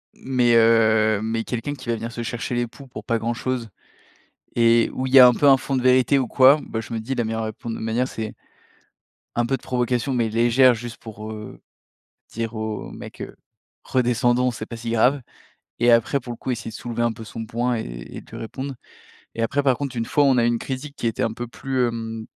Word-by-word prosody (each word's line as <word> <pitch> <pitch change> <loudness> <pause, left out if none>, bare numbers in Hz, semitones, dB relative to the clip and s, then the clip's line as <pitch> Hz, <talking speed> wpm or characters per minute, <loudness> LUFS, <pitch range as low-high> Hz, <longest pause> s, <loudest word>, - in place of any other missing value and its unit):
Mais, 125 -2 +2
heu, 110 -2 +4
mais 115 +1 -2
quelqu'un 125 +5 -4
qui 130 -3 -12
va 115 - +2
venir 115 +1 -5
se 120 0 -5
chercher 120 +1 -3
les 120 0 +1
poux 125 +3 -13
pour - - -9
pas 115 -2 0
grand-chose 120 +1 -3 0.9
et 115 0 +4
où 130 - -2
il 130 - -5
y 135 - +10
a 125 - +11
un 125 - +5
peu 145 - +2
un 135 - +8
fond 135 +1 -2
de - - 0
vérité 130 +2 +4
ou 130 - -1
quoi, 135 +5 +6
bah, 110 - -4
je 115 - -8
me 115 - -2
dis: 130 +5 -4
«La 120 - 0
meilleure 110 0 -2
répondre 110 +1 -6
de - - -8
manière, 115 +3 0
c’est 110 -1 -5 1.0
un 120 - +1
peu 135 +2 0
de - - -25
provocation, 125 +1 -1
mais 120 -3 +1
légère», 120 +3 +4
juste 120 0 -7
pour, 110 -1 -9
heu, 105 -1 -9 0.7
dire 115 0 -4
au 110 -1 -4
mec, - - -9
heu: - - -8 0.5
«Redescendons, 125 0 +2
c’est 110 -2 -7
pas 115 - -7
si 115 0 -5
grave.» 125 +5 +3 0.6
et 120 +1 +4
après, 115 +4 +2
pour 120 -1 -7
le 115 - -11
coup, 130 - -4
essayer 115 -2 -4
de - - -10
soulever 120 0 -3
un 120 -1 +1
peu 115 0 -10
son 115 +1 -7
poing 120 +3 -1
et - - -2
et - - -8
et - - -7
de - - -20
lui - - -8
répondre 130 +4 -6 0.6
et 115 - -3
après, 140 +5 0
par 135 -2 +3
contre, 140 -3 -4
une 115 - -1
fois 145 +5 +2
on 135 -2 +4
a 120 - +3
eu - - +3
une 120 -1 +1
critique 140 +2 -6
qui - - -2
était 115 - -1
un 115 - -1
peu 120 +1 -6
plus, 130 +1 -1
hem 115 -1 -5
120 Hz, 240 wpm, -23 LUFS, 115-130 Hz, 1.0 s, a